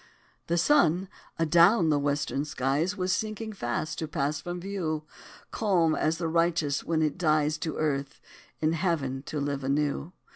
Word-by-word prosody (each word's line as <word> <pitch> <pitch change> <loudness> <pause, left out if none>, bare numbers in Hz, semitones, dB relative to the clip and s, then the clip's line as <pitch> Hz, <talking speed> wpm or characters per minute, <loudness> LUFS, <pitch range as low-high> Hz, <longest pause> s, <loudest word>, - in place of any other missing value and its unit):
The 170 - +1
sun, 180 - +3 0.3
adown 170 +3 +5
the 150 -2 +3
western 145 0 -1
skies, 145 +6 -1
Was 185 0 0
sinking 220 0 -3
fast 145 -1 -3
to 160 - -3
pass 145 -1 -1
from 175 +3 -5
view, 175 -5 -3 0.5
Calm 180 -7 +2
as 155 +1 0
the 165 -1 -2
righteous 165 -3 +1
when 160 -1 0
he 155 -1 +2
dies 155 -2 +1
To 155 0 -3
earth, 140 -2 -2 0.4
in 155 +1 +1
heaven 150 -6 -1
to 150 - -3
live 140 -1 -2
anew. 145 +4 -1
155 Hz, 155 wpm, -28 LUFS, 145-175 Hz, 0.5 s, adown